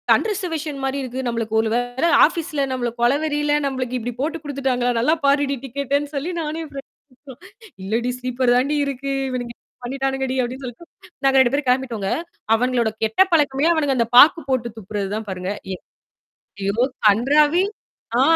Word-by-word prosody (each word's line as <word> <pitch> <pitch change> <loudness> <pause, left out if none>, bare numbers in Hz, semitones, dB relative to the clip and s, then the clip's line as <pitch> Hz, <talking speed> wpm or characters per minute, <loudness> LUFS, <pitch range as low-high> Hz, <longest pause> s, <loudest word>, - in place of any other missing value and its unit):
அன்ரிசர்வேஷன் 325 -8 -3
மாரி 270 +1 -1
இருக்கு. 255 0 -5
நம்மளுக்கு 230 -2 -3
ஒரு 225 - -1
வேள 245 +4 -1 0.2
ஆஃபீஸ்ல 320 -2 -2
நம்மள 245 -2 -1
கொலவெறில, 295 +3 +1
நம்பளுக்கு 255 -2 -2
இப்டி 240 +1 -4
போட்டு 320 +3 -1
குடுத்துட்டாங்களா? 265 -4 -1
நல்லா 255 +7 +3
பாருடி 280 0 +2
டிக்கெட்டன்னு 280 +2 -2
சொல்லி 295 +6 -2
நானே 315 +1 -4
ஃப்ரெண்ட் 275 -1 -9 1.0
"இல்ல 215 +4 0
டீ! 250 - 0
ஸ்லீப்பர் 250 0 +1
தாண் 255 +3 +2
டீ 300 - +1
இருக்கு. 275 0 -4 0.2
இவனுங்க 245 -2 -4
இப்டி - - -85
பண்ணிட்டானுங்க 270 +1 -2
டி" 260 - -2
அப்படின்னு 255 +3 -6
சொல்லிட்டு 250 +8 -9 0.4
நாங்க 270 0 +4
2 260 0 +4
பேரும் 285 -2 -1
கிளம்பிட்டோங்க. 245 -6 0 0.5
அவனுங்களோட 240 -1 +1
கெட்ட 220 - +2
பழக்கமே 290 -1 +2
அவனுங்க 290 -4 +1
அந்த 235 -1 +2
பாக்கு 325 +5 +8
போட்டு 250 -3 0
துப்புறது 200 -1 -4
தான் 220 0 -5
பாருங்க. 185 +1 -4 0.2
எ - - -10 0.9
யோ! 225 +5 +1 0.3
கன்றாாவி 290 - +3 0.6
ஆ - - +5
265 Hz, 160 wpm, -21 LUFS, 240-290 Hz, 1.0 s, பாக்கு